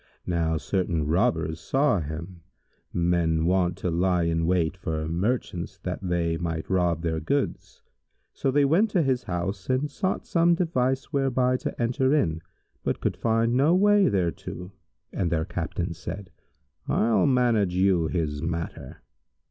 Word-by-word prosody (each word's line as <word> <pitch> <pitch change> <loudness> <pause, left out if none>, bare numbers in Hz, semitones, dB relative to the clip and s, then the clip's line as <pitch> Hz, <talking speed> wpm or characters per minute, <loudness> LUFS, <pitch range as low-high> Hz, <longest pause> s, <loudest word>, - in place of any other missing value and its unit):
Now 80 -2 0
certain 85 -2 -1
Robbers 80 0 +1
saw 135 -4 +2
him, 85 +3 -7 0.5
men 85 -2 +1
wont 90 -1 +1
to 90 - -2
lie 90 +1 +2
in 80 0 0
wait 90 -1 +1
for 80 -4 -3
merchants, 90 0 -2
that 90 0 -3
they 85 -3 0
might 80 -2 -3
rob 85 -3 +1
their 80 -1 -1
goods; 140 - -2 0.5
so 135 - -1
they 140 +2 +3
went 180 +10 +3
to 185 -5 +2
his 130 -3 0
house 95 +3 -3
and 130 +3 0
sought 185 +6 -2
some 170 0 +3
device 135 -5 -1
whereby 130 -2 +2
to - - -5
enter 130 +4 +2
in, 80 - 0 0.4
but - - -1
could - - -1
find 115 +1 +1
no 145 +7 +4
way 205 +1 +5
thereto, 90 -1 -3 0.4
and 90 -4 -1
their 80 -2 0
Captain 85 0 -3
said, 90 +3 -7 0.6
"I'll 115 +6 +2
manage 120 -8 +2
you 90 -3 +3
his 75 -4 -2
matter." 80 -4 -5
90 Hz, 150 wpm, -26 LUFS, 85-125 Hz, 0.6 s, way